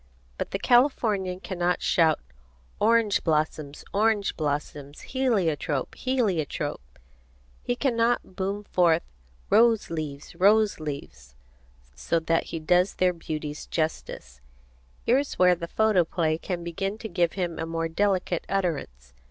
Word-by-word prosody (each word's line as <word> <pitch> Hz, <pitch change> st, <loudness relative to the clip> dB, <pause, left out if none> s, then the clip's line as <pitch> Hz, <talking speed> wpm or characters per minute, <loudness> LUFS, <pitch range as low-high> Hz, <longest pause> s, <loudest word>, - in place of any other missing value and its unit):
But -, -, -2 dB
the -, -, -2 dB
Californian 210 Hz, -6 st, +2 dB
cannot 180 Hz, -1 st, -1 dB
shout 160 Hz, -2 st, +3 dB, 0.6 s
"orange 225 Hz, -2 st, +3 dB
blossoms, 155 Hz, -2 st, -1 dB
orange 210 Hz, -1 st, +2 dB
blossoms; 145 Hz, -1 st, -4 dB
heliotrope, 180 Hz, -, 0 dB
heliotrope!" 210 Hz, -, -1 dB, 0.8 s
He 245 Hz, -, -1 dB
cannot 235 Hz, -6 st, 0 dB
boom 195 Hz, +2 st, -2 dB
forth 170 Hz, -4 st, +2 dB, 0.5 s
"roseleaves, 165 Hz, -11 st, +1 dB
roseleaves" 165 Hz, -, 0 dB, 0.6 s
so 60 Hz, -, -1 dB
that 165 Hz, 0 st, 0 dB
he 165 Hz, -, -5 dB
does 180 Hz, +4 st, +2 dB
their 185 Hz, -1 st, +2 dB
beauties 155 Hz, -3 st, -6 dB
justice. 65 Hz, -, -4 dB, 0.6 s
Here 250 Hz, +3 st, +4 dB
is 285 Hz, -, -4 dB
where 180 Hz, 0 st, +6 dB
the 170 Hz, -1 st, -5 dB
photoplay 170 Hz, -6 st, +1 dB
can 175 Hz, -1 st, -4 dB
begin 195 Hz, +5 st, -3 dB
to 220 Hz, -, -6 dB
give 175 Hz, -4 st, 0 dB
him 175 Hz, -4 st, -3 dB
a 160 Hz, -, -3 dB
more 165 Hz, 0 st, -2 dB
delicate 185 Hz, 0 st, 0 dB
utterance. 140 Hz, -, -3 dB
175 Hz, 120 wpm, -26 LUFS, 160-205 Hz, 0.8 s, where